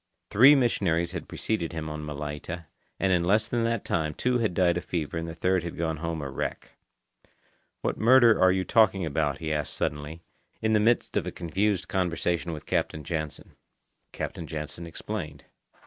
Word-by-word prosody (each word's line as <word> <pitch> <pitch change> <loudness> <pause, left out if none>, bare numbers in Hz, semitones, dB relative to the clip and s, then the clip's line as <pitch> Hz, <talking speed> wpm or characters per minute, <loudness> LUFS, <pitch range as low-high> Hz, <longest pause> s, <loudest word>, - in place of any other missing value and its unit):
Three 130 +8 +8
missionaries 85 - +1
had 90 -2 -6
preceded 90 -7 -2
him 80 -1 -4
on 75 0 -5
Malaita, 75 +3 -5 0.3
and 95 -1 +2
in 85 -1 +2
less 105 +5 +3
than 120 +1 -1
that 115 -2 -1
time 75 -2 -1
two 125 -1 +1
had 110 -6 0
died 90 -2 +3
of 90 - -3
fever 85 -3 -3
and 80 0 -3
the 80 - -7
third 90 +2 +1
had 85 0 -6
gone 80 -1 -1
home 80 -1 -3
a 70 - -4
wreck. - - -4 1.1
"What - - -2
murder 120 0 +6
are 95 - +6
you 95 0 +1
talking 100 -5 +4
about?" 75 -2 0
he 80 -1 -2
asked 75 -1 -2
suddenly, 75 +3 -3 0.4
in 110 0 +1
the 105 - +5
midst 115 +3 +2
of - - -1
a - - -2
confused 95 +3 -1
conversation 85 -2 -1
with 75 -1 -7
Captain 75 - -1
Jansen. 75 0 -4 0.6
Captain 80 - -5
Jansen 80 +2 -5
explained. 85 - -6
85 Hz, 180 wpm, -27 LUFS, 80-100 Hz, 1.1 s, Three